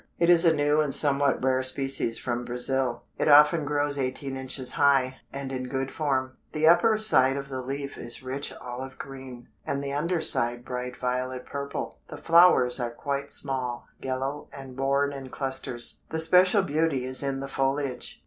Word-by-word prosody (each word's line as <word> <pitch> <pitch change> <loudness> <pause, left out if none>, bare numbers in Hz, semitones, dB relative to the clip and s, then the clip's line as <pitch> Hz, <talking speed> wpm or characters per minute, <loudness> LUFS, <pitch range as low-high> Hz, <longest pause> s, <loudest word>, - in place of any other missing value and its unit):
It 170 +1 +3
is 175 0 +5
a 165 -1 +4
new 145 +1 +2
and 150 -2 -1
somewhat 140 -2 +1
rare 130 0 +1
species 130 -3 +1
from 120 -1 -3
Brazil. 125 0 -2 0.2
It - - 0
often 150 +1 +6
grows 145 0 0
eighteen 135 +1 -3
inches 130 -1 -2
high, 135 -2 +2
and 135 -1 -6
in 130 -1 -4
good 135 0 -3
form. 130 -4 -2
The 155 +1 +1
upper 175 +6 +5
side 135 -11 +4
of 140 0 -6
the 130 -1 -5
leaf 140 +2 -6
is 120 +2 -5
rich 135 +2 -4
olive 125 +2 -8
green, 130 -3 -10
and 140 0 -3
the 140 0 -4
under 170 +4 -1
side 120 -5 +4
bright 125 0 -5
violet 125 0 -3
purple. 140 0 -6
The 150 - -9
flowers 165 -6 +4
are 120 -1 -2
quite 140 -1 -4
small, 130 -3 -2
yellow, 135 +2 -4
and 135 -2 -11
borne 140 +1 0
in 135 -1 -8
clusters. 130 -3 -1
The 160 - -3
special 180 +5 +5
beauty 150 -5 -1
is 130 0 +3
in 135 -1 -2
the 135 - -5
foliage. 135 -1 -2
135 Hz, 175 wpm, -26 LUFS, 130-145 Hz, 0.2 s, often